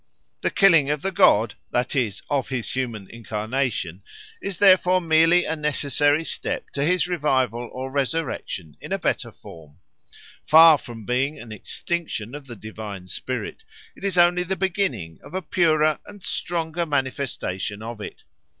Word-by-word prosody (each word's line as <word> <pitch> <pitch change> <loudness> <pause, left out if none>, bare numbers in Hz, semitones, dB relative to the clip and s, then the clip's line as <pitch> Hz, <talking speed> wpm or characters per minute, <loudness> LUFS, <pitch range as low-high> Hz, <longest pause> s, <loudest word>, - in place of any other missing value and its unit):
The - - +1
killing 165 -8 +5
of 150 -1 -1
the 195 - 0
god, 110 - +4 0.2
that 125 +3 -1
is, 110 -7 -1
of 140 -3 -1
his 125 -4 -3
human 115 -7 -3
incarnation, 110 -4 -3 0.4
is 195 -3 -4
therefore 185 -2 +5
merely 165 +1 +4
a 160 - -1
necessary 150 0 +1
step - - -4
to 140 - -2
his 180 +3 +2
revival 130 - 0
or 130 +1 -6
resurrection 135 - -3
in - - -9
a - - +1
better - - -1
form. 75 -3 -14 0.7
Far 160 -1 +8
from 115 -3 -10
being 130 +6 0
an 115 -1 -10
extinction 125 - -4
of 145 -1 -9
the 120 - -8
divine 105 -3 -8
spirit, - - -5 0.3
it - - -16
is 195 -3 -1
only 175 +1 +5
the 185 +2 -2
beginning 170 - -2
of 145 +6 -10
a 190 - -1
purer 155 -3 +2
and 205 -2 -12
stronger 170 0 -2
manifestation 130 -8 -2
of 115 -1 -7
it. - - -8
140 Hz, 155 wpm, -23 LUFS, 115-165 Hz, 0.7 s, Far